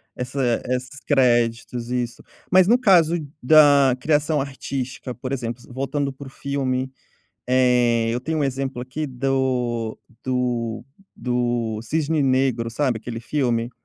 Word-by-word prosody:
essa 125 -1 -1
esses 130 +2 -3
créditos, 120 -3 +1
isso. 120 -1 -3 0.3
Mas, 185 0 +6
no 235 +4 +5
caso 175 -8 +5 0.3
da 140 -2 +6
criação 150 +1 +1
artística, 135 -2 -5
por 130 +2 -5
exemplo, 120 -2 -4
voltando 140 +1 -2
pro 135 0 -10
filme, 135 -1 -2 0.6
eh, 125 -3 +3
eu 120 - -1
tenho 160 +5 -2
um 145 - +1
exemplo 135 -1 -3
aqui 140 +5 -4
do 125 -4 -1 0.3
do 120 -3 -1 0.3
do 120 -3 -1
Cisne 155 +4 0
Negro, 130 -3 +1
sabe, 125 -1 0
aquele 115 +1 -6
filme? 120 -2 -1
130 Hz, 125 wpm, -22 LUFS, 120-140 Hz, 0.6 s, Mas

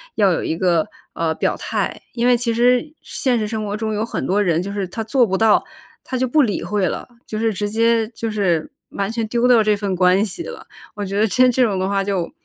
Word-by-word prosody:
要 200 -3 +4
有 170 - -1
一 160 - -2
个， 175 -4 +2 0.3
呃， 160 -1 -1
表 - - 0
态。 - - -3
因 240 0 -1
为 245 0 +5
其 235 0 -1
实 245 +4 +2
现 250 -3 0
实 215 -1 -1
生 220 0 -3
活 205 0 -3
中 220 0 -2
有 210 +1 -1
很 230 - -3
多 200 +3 +1
人 175 -3 +1
就 200 - -5
是 200 -2 -3
他 225 +5 -5
做 240 +2 +2
不 190 -1 0
到， 220 -2 +4 0.4
他 260 - -4
就 260 +1 +1
不 300 +5 +3
理 220 -8 0
会 205 -3 0
了， - - -4 0.2
就 215 - -4
是 225 0 0
直 205 +1 -2
接 230 0 +2
就 230 -1 -4
是 180 -7 0 0.2
完 200 +2 -3
全 230 -1 -2
丢 235 +2 +1
掉 240 -3 +6
这 210 0 +3
份 200 -2 -2
关 185 +2 +4
系 210 - -6
了。 480 +4 -9 0.3
我 205 - -4
觉 200 +1 -2
得 220 - +4
这 250 +5 +4
这 250 +1 +2
种 210 -5 +1
的 190 - 0
话 200 -1 +1
就 190 -4 -2
215 Hz, 270 characters per minute, -20 LUFS, 195-235 Hz, 0.4 s, 掉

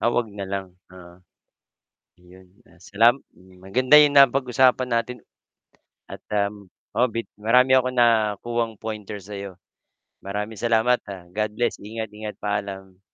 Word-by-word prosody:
Ah, 120 - +2
'wag 120 -3 -1
na 100 -2 -7
lang. 100 -1 -4 0.2
Ah. 90 -1 -15 1.0
Ayun 90 +1 -19 0.2
ah, 90 - -22
salam 115 +7 +3 0.4
maganda 130 +8 +2
yung 145 -1 +4
napag-usapan 130 -1 +3
natin, 115 +1 -1 0.9
at - - -8 0.2
ah. 100 -1 +1 0.5
Oo 125 +2 +3
bit 115 +1 -4
marami 125 +5 +4
akong 130 0 0
nakuhang 115 0 +1
pointers 105 -2 -7
sa 100 - -6
'yo. 100 -1 -7 0.7
Maraming 105 +2 -5
salamat, 120 +1 +2
ah, 95 -3 -8
God 105 +1 -3
bless, 120 +1 -1
ingat-ingat. 105 0 -7
Paalam. 95 -2 -5
110 Hz, 130 wpm, -23 LUFS, 100-120 Hz, 1.0 s, yung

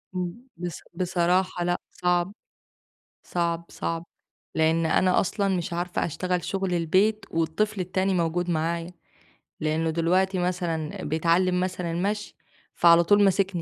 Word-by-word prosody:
آمم، 180 -1 -2 0.2
بص 175 -2 -5
بصراحة 180 0 +1
لأ 175 0 +1
صعب. 180 +1 0 0.9
صعب، 170 -1 -1
صعب 165 0 -3 0.5
لأن 160 +1 +2
أنا 180 +3 +3
أصلًا 200 +1 0
مش 175 +1 -3
عارفة 175 +1 -1
أشتغل 180 +2 -2
شغل 190 -2 -1
البيت 190 +6 +2
والطفل 165 +6 0
التاني 185 +1 0
موجود 175 0 0
معايا، 170 +1 -1 0.7
لأنه 155 +1 0
دلوقتي 180 +4 +1
مثلًا 175 -3 -2
بيتعلم 170 +4 +2
مثلًا 180 -2 -2
المشي، 200 +5 -2 0.4
فعلى 170 0 +6
طول 205 +4 +5
ماسكني، 195 -2 +2
175 Hz, 125 wpm, -26 LUFS, 165-185 Hz, 0.9 s, فعلى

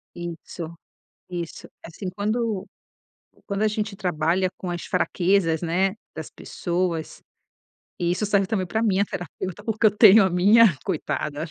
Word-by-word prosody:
Isso 170 -1 -7 0.6
isso. 170 -2 -6 0.2
É - - -8
assim, 185 +3 -6
quando 215 -1 -1 0.8
quando 200 0 -3
a - - +4
gente 210 -1 -2
trabalha 180 +1 0
com 185 - -5
as 175 -1 -4
fraquezas, 180 -2 +1
né, 185 +4 +1 0.2
das 160 -2 -6
pessoas, 175 -2 -3 0.8
e 175 0 0
isso 185 +4 0
serve 200 -1 +2
também 190 -3 -1
pra 220 +5 -1
minha 200 -3 +2
terapeuta, 185 +2 -6
porque 220 0 +2
eu - - +6
tenho 215 -1 +8
a 190 - +1
minha. 200 +2 +6
Coitada. 155 -4 -2
185 Hz, 145 wpm, -24 LUFS, 170-205 Hz, 0.8 s, tenho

